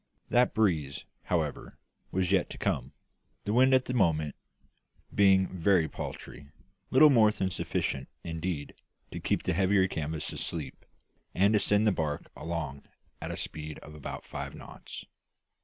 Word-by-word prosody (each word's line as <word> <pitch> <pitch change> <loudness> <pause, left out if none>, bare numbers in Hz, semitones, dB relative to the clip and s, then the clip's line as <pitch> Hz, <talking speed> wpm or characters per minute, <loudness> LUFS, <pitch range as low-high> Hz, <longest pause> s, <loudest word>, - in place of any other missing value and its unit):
That 125 +1 +3
breeze, 80 -11 +1 0.2
however, 80 -5 -2 0.3
was 95 -1 0
yet 95 -2 +3
to - - -8
come; - - -1 0.5
the 105 - -1
wind 130 +3 +5
at 130 - +2
the 125 - -3
moment 80 - +2 0.8
being 95 -1 +5
very 90 -2 +3
paltry 70 -2 -8 0.4
little 150 +3 +7
more 110 -5 +6
than 95 -3 -1
sufficient, 65 -6 -2
indeed, 80 -2 -4 0.4
to - - -5
keep - - 0
the - - 0
heavier 95 +1 +3
canvas 80 -3 -3
"asleep," 75 -6 -5 0.5
and 100 +4 +4
to 105 - +5
send 105 +2 +3
the 105 - +5
barque 75 -5 -3
along 80 -5 -4 0.4
at - - -4
a - - -4
speed 75 -1 -6
of 75 - -11
about 75 -2 -7
five - - -6
knots. - - -10
90 Hz, 150 wpm, -30 LUFS, 75-100 Hz, 0.8 s, little